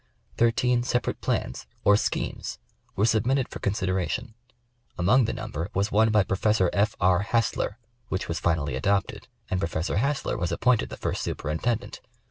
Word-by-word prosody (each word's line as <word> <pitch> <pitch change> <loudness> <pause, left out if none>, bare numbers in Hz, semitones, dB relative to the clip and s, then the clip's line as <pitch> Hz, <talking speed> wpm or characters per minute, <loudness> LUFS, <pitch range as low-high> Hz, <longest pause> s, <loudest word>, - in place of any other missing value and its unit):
Thirteen 120 +1 +2
separate 120 0 -1
plans, - - -2 0.2
or 105 - +6
schemes, 100 - -2 0.4
were 100 - +2
submitted 120 +4 +2
for - - -7
consideration; 95 +2 -1 0.6
among 110 +9 +4
the - - -1
number 80 +6 -4
was 100 +3 +1
one 110 +2 +4
by 105 -2 +4
Professor 95 -1 +1
F, 105 +3 +2
R. 90 -1 +4
Hassler, 110 0 0 0.3
which 95 - -3
was 85 - -2
finally 80 -6 0
adopted, 95 +8 0 0.2
and 95 - +1
Professor 85 0 -1
Hassler 140 +6 0
was 85 - -1
appointed 120 -1 +2
the - - -7
first - - -2
superintendent. 95 +10 -2
105 Hz, 150 wpm, -26 LUFS, 90-115 Hz, 0.6 s, or